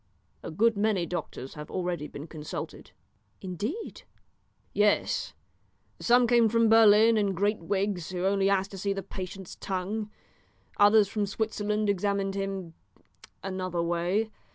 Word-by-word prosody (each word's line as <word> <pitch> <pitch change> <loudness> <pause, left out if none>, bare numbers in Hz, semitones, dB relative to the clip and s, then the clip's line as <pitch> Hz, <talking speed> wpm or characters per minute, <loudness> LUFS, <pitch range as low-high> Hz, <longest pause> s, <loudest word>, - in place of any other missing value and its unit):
"A - - -6
good 220 +8 +2
many 205 -3 +1
doctors 170 -6 -5
have 150 0 -9
already 175 -4 -3
been 145 +1 -8
consulted." 155 -2 -7 0.5
"Indeed!" 210 - -5 0.7
"Yes, 205 0 +1 0.6
some 245 +1 +4
came 235 -1 +4
from 230 0 +3
Berlin 225 0 +6
in 200 -2 +1
great 205 +4 +1
wigs 190 0 -2
who 180 0 -3
only 195 0 +2
asked 195 0 +1
to 195 - -8
see 200 +1 0
the 195 0 -5
patient's 190 0 -8
tongue. 200 +3 -3 0.7
Others 205 0 +6
from 205 0 -2
Switzerland 210 0 -1
examined 200 0 0
him 195 -3 -4 0.7
another 185 -3 -2
way. 175 +6 0
195 Hz, 130 wpm, -28 LUFS, 185-210 Hz, 0.7 s, Berlin